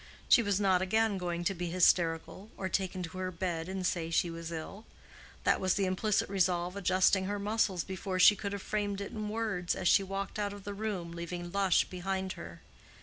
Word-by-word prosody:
She - - +7
was 205 -3 0
not 190 -3 +3
again 220 +1 +1
going 175 -1 -2
to 195 - +1
be 175 -1 -4
hysterical, 175 +2 +2
or 190 - -3
take 190 0 -1
to 180 0 -6
her 185 0 -2
bed 170 -1 -3
and 190 -1 -3
say 170 -2 -1
she 170 +1 +1
was 165 0 -6
ill. 170 +6 -6 0.6
That - - +3
was 185 -1 +2
the 200 - +1
implicit 190 +3 +1
resolve 180 -2 0
adjusting 190 0 +3
her 205 +2 -2
muscles 200 -4 0
before 190 0 -4
she 185 +3 +8
could 200 0 -4
have 200 -1 -5
framed 205 -2 -2
it 200 - -5
in 215 -1 -4
words, 210 -5 -1
as 180 - -1
she - - +6
walked 195 +2 -4
out 205 -1 -1
of 205 -1 -10
the 205 - -5
room, 200 -5 -4
leaving 175 +1 -6
Lush 195 -2 +3
behind 190 +1 -3
her. 85 0 -10
190 Hz, 205 wpm, -31 LUFS, 175-200 Hz, 0.6 s, she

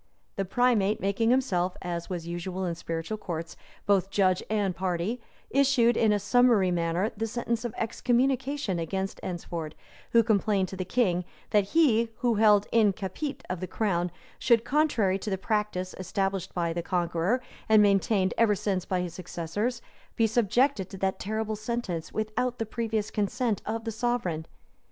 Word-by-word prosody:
The 195 - -1
primate, 215 -1 +2
making 200 +4 +1
himself, 190 -9 +1
as 170 0 -4
was 175 -3 -4
usual 180 +2 -4
in 175 - -1
spiritual 165 +5 -4
courts, 165 -4 -5 0.3
both 195 -2 +2
judge 190 -2 +2
and 205 -4 0
party, 185 +6 -2 0.3
issued 265 -3 +4
in 220 -2 +3
a 210 - +3
summary 210 -2 +4
manner 175 +4 0
the 225 +2 -2
sentence 235 0 -2
of 240 - -4
excommunication 250 -1 0
against 190 +3 -3
Eynsford, 170 -3 -5 0.4
who 230 0 +5
complained 205 -3 +1
to - - -6
the 185 - -3
king, 180 -4 +1 0.3
that 205 -2 +4
he, 235 -8 +4
who 240 -2 +3
held 210 -1 +5
"in 215 -3 +4
capite" 220 - -5
of 180 -1 -3
the 185 - -4
crown, 180 -5 0 0.3
should, 230 -2 +4
contrary 245 -10 +2
to 210 - -4
the 190 - -1
practice 210 -2 -1
established 195 0 -2
by 170 -2 0
the 170 - -2
Conqueror, 175 +5 0 0.3
and 215 -1 +7
maintained 195 -1 +2
ever 220 -3 +4
since 190 -2 -1
by 185 -1 0
his 175 -2 -4
successors, 185 +7 -3 0.3
be 225 - +3
subjected 225 0 +2
to 195 - -8
that 190 0 -1
terrible 220 +1 -2
sentence 215 -7 -4
without 230 +3 -2
the 225 - -2
previous 220 -1 -2
consent 220 +2 -1
of 225 +1 -2
the 225 - -3
sovereign. 220 -9 -1
205 Hz, 165 wpm, -28 LUFS, 185-230 Hz, 0.4 s, and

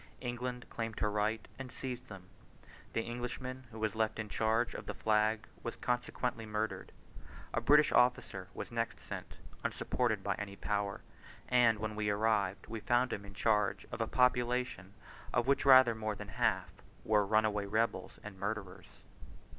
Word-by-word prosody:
England 125 0 -4
claimed 115 -1 -4
her 105 - +1
right 105 +1 0
and 130 -2 -6
seized 125 -2 -5
them. 100 -3 -9 0.7
The 115 - 0
Englishman 125 +2 -5
who 115 - -10
was 110 -2 0
left 110 0 0
in 110 -1 -4
charge 110 +3 +1
of - - -7
the - - -4
flag 110 0 +2 0.2
was 120 - -4
consequently 125 -1 -1
murdered. 110 0 -3 0.6
A 120 - +1
British 150 +5 +6
officer 125 -6 +2
was - - -6
next 115 -1 -2
sent, - - -7 0.3
unsupported 110 -6 0
by 100 - +1
any 100 -1 -5
power: 100 -1 -2 0.5
and 120 -3 +5
when 105 0 -3
we 105 -1 0
arrived, 105 -2 +1
we 115 0 -5
found 120 +3 +2
him 100 - -5
in 100 0 -11
charge 105 -2 +1
of - - -4
a - - +1
population, 125 -6 +1 0.4
of 120 -1 +2
which 140 +1 +2
rather 130 -3 +9
more 110 -1 -3
than - - -8
half - - +1 0.3
were 105 -1 +4
runaway 105 0 +2
rebels 110 -2 0
and 100 -3 -9
murderers. 100 -2 -5
110 Hz, 160 wpm, -34 LUFS, 105-120 Hz, 0.7 s, rather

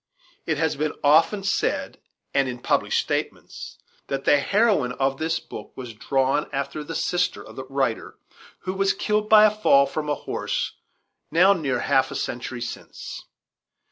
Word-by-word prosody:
It 160 -2 0
has 160 0 0
been 150 +1 -1
often 160 +7 +4
said, 200 - -1 0.3
and 135 -2 +2
in 125 - -5
published 120 - +1
statements, - - -4 0.3
that 135 0 -3
the 145 - +5
heroine 195 - +2
of 135 +1 -1
this 160 +1 0
book - - -10
was 125 -3 -7
drawn 135 +6 0
after 140 +2 -3
the 165 +2 -7
sister 180 0 -1
of - - -13
the 130 - -6
writer, 135 -4 -2 0.4
who 185 - -3
was 195 0 +2
killed 210 0 -1
by 215 -1 +8
a 215 - +5
fall 170 -10 +4
from 150 +2 -4
a 145 - +1
horse - - -3 0.6
now 180 +5 +5
near 150 -8 -1
half 135 - +2
a - - -7
century 120 0 -4
since. 120 - -7
150 Hz, 165 wpm, -24 LUFS, 135-185 Hz, 0.6 s, by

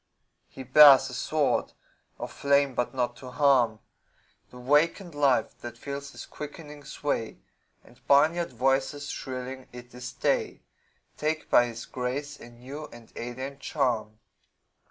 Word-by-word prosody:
He 135 - -10
bears 135 0 +8
a - - -9
sword 150 +2 0 0.4
of - - -6
flame 140 -1 +2
but 125 0 -1
not 120 -1 -1
to 130 - -10
harm 125 -5 +3 0.7
The 125 - -13
wakened 150 +7 +1
life 140 -6 +2
that 120 0 -8
feels 140 +2 -6
his - - -9
quickening 150 0 -9
sway 130 -6 -3 0.5
And 125 +2 -21
barnyard 160 +5 +4
voices 135 +3 0
shrilling 130 0 -6
"It 125 0 -12
is 125 0 -7
day!" - - -1 0.5
Take 155 +1 -2
by 120 - +6
his 115 0 -7
grace 140 +4 -4
a 120 - -12
new 130 +6 -9
and 120 -4 -15
alien 130 +3 -6
charm. 120 -7 -1
135 Hz, 135 wpm, -27 LUFS, 125-145 Hz, 0.7 s, bears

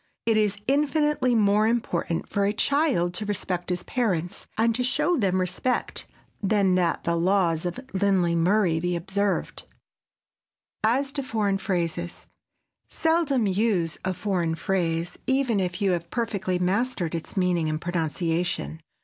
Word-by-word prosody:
It 225 -1 +3
is 210 -2 +2
infinitely 295 -2 +2
more 210 0 +4
important 180 -7 -1
for 200 - 0
a 200 +1 +2
child 260 - +1
to 210 +4 -3
respect 185 -3 -2
his 180 -1 -1
parents 180 -9 -2
and 230 +1 +3
to 250 +2 -1
show 270 +7 +2
them 190 - +1
respect 185 +8 -2 0.3
than 200 -2 +2
that 180 -2 +1
the 170 - 0
laws 175 -1 +2
of 175 - -5
Lindley 190 -3 +2
Murray 175 -1 +2
be 175 +1 -1
observed. 195 +3 -1 1.2
[Sidenote: 235 +5 +3
AS 275 - -9
TO 280 - -3
FOREIGN 215 -6 0
PHRASES] 175 -2 -3 0.6
Seldom 320 -7 +1
use 190 -4 0
a 185 -1 -1
foreign 180 -4 -1
phrase 170 -1 -1
even 265 -5 +2
if 180 +2 -2
you 195 - +3
have 170 -1 -2
perfectly 200 -6 -1
mastered 185 -1 0
its 165 +4 -6
meaning 175 -4 +1
and 155 0 -2
pronunciation. 170 0 -2
190 Hz, 145 wpm, -25 LUFS, 175-225 Hz, 1.2 s, more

